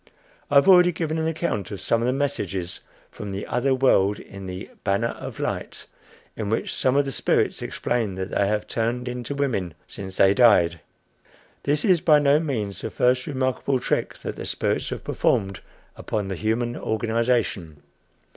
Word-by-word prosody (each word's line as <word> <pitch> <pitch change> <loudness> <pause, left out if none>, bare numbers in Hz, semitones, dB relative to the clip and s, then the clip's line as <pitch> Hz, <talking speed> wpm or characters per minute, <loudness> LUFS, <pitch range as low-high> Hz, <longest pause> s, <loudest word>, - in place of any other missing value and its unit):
I 145 - -1
have 140 - +6
already 180 -2 +7
given 160 -1 -2
an 160 - 0
account 160 - -2
of 100 -2 -6
some 115 +5 +1
of 120 - 0
the - - +3
messages 100 -10 -2 0.3
from 105 -1 -7
the 95 +1 -4
other 130 +2 +1
world 105 -6 +3
in 100 -1 -10
the 90 +1 -7
"Banner 100 +4 +1
of - - -8
Light," - - -4 0.5
in 105 -3 -3
which 110 - -1
some 130 0 +1
of 145 0 +3
the 135 - -3
spirits - - +1
explain 115 -6 -2
that 95 +1 -5
they 100 - +1
have 105 +1 0
turned 120 +3 -2
into 125 +2 -4
women 105 - -1
since 95 -1 -8
they 95 0 +5
died. 90 -8 +4 0.9
This 145 +1 +1
is 185 -6 +4
by 155 -4 +6
no 145 0 +4
means 110 -11 -3
the - - -3
first 125 +3 +1
remarkable 130 -1 0
trick - - -1
that - - -5
the - - -5
spirits - - -1
have - - -5
performed 95 -1 0 0.4
upon 105 -3 -3
the 95 - -2
human 115 +5 -1
organization. 110 - -1
115 Hz, 175 wpm, -24 LUFS, 100-140 Hz, 0.9 s, already